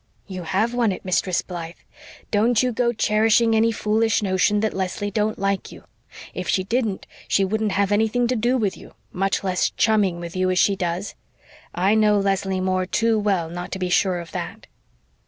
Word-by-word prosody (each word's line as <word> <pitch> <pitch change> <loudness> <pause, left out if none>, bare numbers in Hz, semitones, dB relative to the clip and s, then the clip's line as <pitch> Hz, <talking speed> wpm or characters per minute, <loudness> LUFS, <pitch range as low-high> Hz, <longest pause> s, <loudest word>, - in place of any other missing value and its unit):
"You 185 -2 -7
have 195 +8 0
won 240 -4 +2
it, 185 - -7
Mistress 185 0 0
Blythe. 170 -1 -7 0.6
Don't 225 +3 +3
you 250 - +1
go 235 +1 +1
cherishing 225 +1 +2
any 225 +1 +3
foolish 220 0 +1
notion 190 +2 +2
that 220 - 0
Leslie 190 +2 -3
don't 215 +1 -1
like 195 0 -2
you. - - -13 0.5
If - - -5
she 185 - +1
didn't 220 -1 -2 0.2
she 195 - +2
wouldn't 215 +1 -1
have 200 0 +1
anything 220 +3 +2
to 250 +1 0
do 240 +3 +1
with 210 -5 -1
you, - - -15 0.2
much 195 +2 -1
less 185 -2 +1
chumming 205 -5 +1
with 170 0 -7
you 185 0 +1
as 185 - 0
she 200 +2 +3
does. 180 +1 -3 0.6
I 190 +4 +2
know 215 -1 +4
Leslie 195 -1 0
Moore 185 0 0
too 225 +3 +1
well 195 -5 0
not 175 +2 -7
to - - -3
be 185 -1 -2
sure 180 0 +2
of 170 -1 -9
that." - - -6
200 Hz, 190 wpm, -22 LUFS, 185-220 Hz, 0.6 s, know